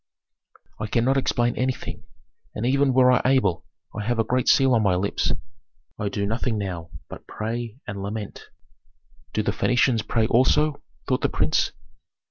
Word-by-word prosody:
"I 110 - -3
cannot 120 +5 +2
explain 120 -2 +1
anything, 130 0 -3 0.5
and 110 - -2
even 135 +2 +3
were 125 0 +5
I 125 - +3
able 125 -10 +1 0.3
I 105 - -3
have 120 +2 -1
a 115 - +3
great 125 +2 0
seal 135 -2 +5
on 115 - +3
my 100 -4 +2
lips 100 +3 0 0.7
I 105 - -1
do 100 0 -2
nothing 115 +2 -1
now 90 -5 -4 0.2
but - - -11
pray 115 +1 -4
and 100 -1 -6
lament." 105 +1 -6 0.8
"Do 110 - -1
the - - 0
Phœnicians 125 -3 +1
pray 115 -2 +2
also?" 140 +6 +2 0.3
thought - - +1
the - - +1
prince. - - +1
115 Hz, 160 wpm, -24 LUFS, 105-130 Hz, 0.8 s, were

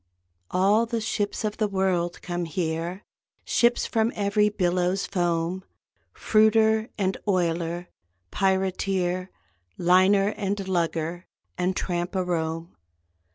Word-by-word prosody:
All 205 +5 +3
the 230 0 -1
ships 210 -1 -2
of 210 -1 -2
the 215 - +1
world 190 -3 -1
come 175 -1 -3
here, 165 +3 -3 0.4
Ships 240 0 +2
from 225 +1 +1
every 210 +1 +2
billow's 180 -1 0
foam; 175 -1 -1 0.5
Fruiter 220 +1 +3
and 190 -2 0
oiler, 175 -2 0 0.4
pirateer, 190 -1 0 0.5
Liner 185 +3 +4
and 200 -2 -3
lugger 170 -1 -1 0.3
and 180 +1 -1
tramp 175 +1 -2
a 185 - +1
roam. 165 -1 -3
185 Hz, 110 wpm, -25 LUFS, 175-205 Hz, 0.5 s, Liner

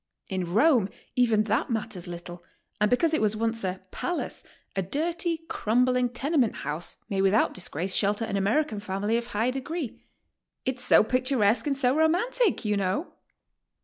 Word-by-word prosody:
In 185 -3 -3
Rome, 230 - +4 0.3
even 230 -4 +3
that 215 +1 0
matters 210 -6 -3
little, 175 0 -8 0.4
and 210 0 +3
because 315 +7 +2
it 315 - +2
was 215 0 +3
otice 225 0 -1
a 185 0 -2
"Palace," 355 -1 -3 0.3
a 195 - +1
dirty, 330 - -1
crumbling 250 +1 +1
tenement 260 0 0
house 155 +3 -3
may 195 -3 -1
without 195 +3 +3
disgrace 185 +1 -3
shelter 205 +2 +1
an 200 - -3
American 210 +4 +1
family 205 +2 -1
of 235 0 -1
high 230 +2 0
degree. 270 +1 -5 0.6
'Tt's 255 -1 -2
so - - +6
picturesque 255 0 +2
and 275 -2 +1
so 260 -1 +3
romantic, 365 - +2
you 210 -1 +1
know!" 195 - -1
225 Hz, 155 wpm, -27 LUFS, 200-270 Hz, 0.6 s, so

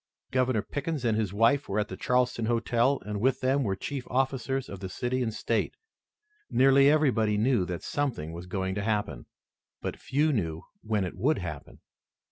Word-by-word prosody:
Governor 130 -4 +1
Pickens 145 -2 -3
and 115 -2 +2
his 110 -4 0
wife 115 +7 +2
were 100 - -1
at 105 - 0
the 95 - -6
Charleston 125 +1 +1
Hotel, 120 +3 +2
and 105 -1 -3
with 130 +3 +2
them 135 +2 +2
were 100 -7 0
chief 135 +6 -4
officers 135 +1 0
of 100 - -8
the 95 -1 -5
city 125 +6 -2
and 115 -2 0
state. 110 0 -1 0.7
Nearly 135 +1 +5
everybody 125 -9 +3
knew 110 -3 +2
that 90 -1 -5
something 120 - -2
was 85 +2 -8
going 95 0 -2
to 100 - -2
happen, 105 -1 -2 0.5
but - - -4
few 150 +3 +1
knew 80 -8 -2 0.2
when 105 -2 0
it 90 - -6
would 145 +4 +2
happen. 80 -6 -7
115 Hz, 180 wpm, -28 LUFS, 100-135 Hz, 0.7 s, Nearly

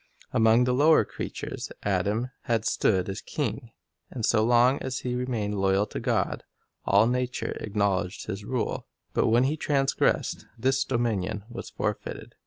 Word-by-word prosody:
Among 115 0 +5
the 125 0 +1
lower 155 +5 +5
creatures - - -6
Adam 105 +6 0
had 115 -2 0
stood 95 -5 +2
as 95 -1 -4
king, - - -3 0.4
and 115 -4 -3
so 110 -2 +3
long 120 +3 +4
as 130 0 -4
he 125 - -2
remained 115 -5 -2
loyal 95 +1 +3
to - - -6
God, - - 0 0.4
all 100 +2 +5
nature 125 +1 -1
acknowledged 100 -2 -1
his 105 -1 -5
rule; 125 +3 -2 0.3
but - - +2
when 120 +3 +4
he 140 +4 +1
transgressed, 135 -3 +1
this 135 +3 +2
dominion 110 -6 -1
was 120 - -7
forfeited. - - -4
115 Hz, 150 wpm, -27 LUFS, 105-125 Hz, 0.4 s, Among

